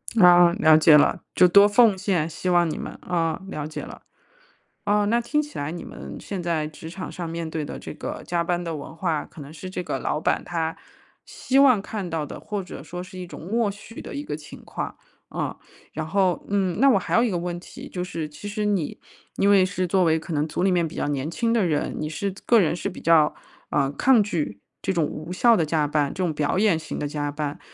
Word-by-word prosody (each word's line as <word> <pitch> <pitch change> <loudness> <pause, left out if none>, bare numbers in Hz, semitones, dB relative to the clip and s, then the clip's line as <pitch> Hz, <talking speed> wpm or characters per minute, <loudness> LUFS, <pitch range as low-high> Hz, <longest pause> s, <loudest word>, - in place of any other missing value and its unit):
啊， 175 -4 +7
了 155 -2 +6
解 155 -1 +7
了， 145 - +3
就 180 - +7
多 200 +3 +7
奉 210 -1 +5
献， 185 -5 0
希 180 +3 -3
望 175 -1 +4
你 - - -4
们。 - - -6
啊， 165 -2 -1
了 150 -5 -4
解 155 - -6
了。 - - -10 0.8
哦， 205 0 +3
那 235 +3 +3
听 270 +6 0
起 295 0 -9
来 145 +1 -2
你 175 - -6
们 - - -9
现 195 -3 -5
在 165 -3 -1
职 160 +1 -10
场 180 +2 -7
上 170 -2 -5
面 165 -1 -4
对 155 -2 -3
的 - - -6
这 - - -8
个 - - -6
加 175 -1 0
班 175 0 -1
的 165 -2 -3
文 150 - -9
化， 165 -3 -1
可 160 - -13
能 140 +1 -10
是 165 +4 -8
这 180 -1 -4
个 - - -3
老 150 - -2
板 - - +1
他 165 -2 -2 0.5
希 265 +1 0
望 255 -7 +6
看 200 -3 -5
到 160 -2 -2
的， - - -8
或 205 -2 -4
者 180 - -9
说 175 +4 -7
是 185 0 -10
一 180 - -6
种 - - -10
默 225 +3 +1
许 205 +3 -9
的 - - -8
一 285 - -4
个 150 - -4
情 150 - -12
况。 - - -5 0.4
嗯， - - -2 0.4
然 155 +1 -4
后， 185 -1 +1
嗯， 190 -4 0
那 275 +2 +6
我 245 - +5
还 190 - -3
有 - - +5
一 240 - +2
个 180 - -1
问 175 0 -3
题 - - -11
就 180 - -4
是 165 -4 -4
其 150 +7 -9
实 210 +1 -3
你 200 -7 -1 0.4
因 200 - +3
为 195 -2 +6
是 185 0 -2
作 180 0 +2
为 160 0 +3
可 165 +2 -7
能 150 0 0
组 175 - -2
里 190 - +3
面 175 -2 +2
比 - - -11
较 - - -1
年 145 +1 -2
轻 230 +7 0
的 230 -4 +2
人， 155 -4 0
你 155 - -2
是 190 +5 -3
个 230 -3 +5
人 165 - +2
是 180 - -3
比 180 - -10
较， 160 -2 +4 0.4
呃， 140 -1 +1
抗 230 - +4
拒 150 - -3 0.2
这 190 - -1
种 170 - +1
无 155 +4 -6
效 230 +4 +5
地 165 - +2
加 155 -1 +1
班、 145 -1 0
这 185 - -2
种 170 - 0
表 150 +3 0
演 200 -5 +3
型 155 - -6
地 150 - -2
加 145 0 -2
班。 145 0 -4
175 Hz, 265 characters per minute, -24 LUFS, 155-200 Hz, 0.8 s, 啊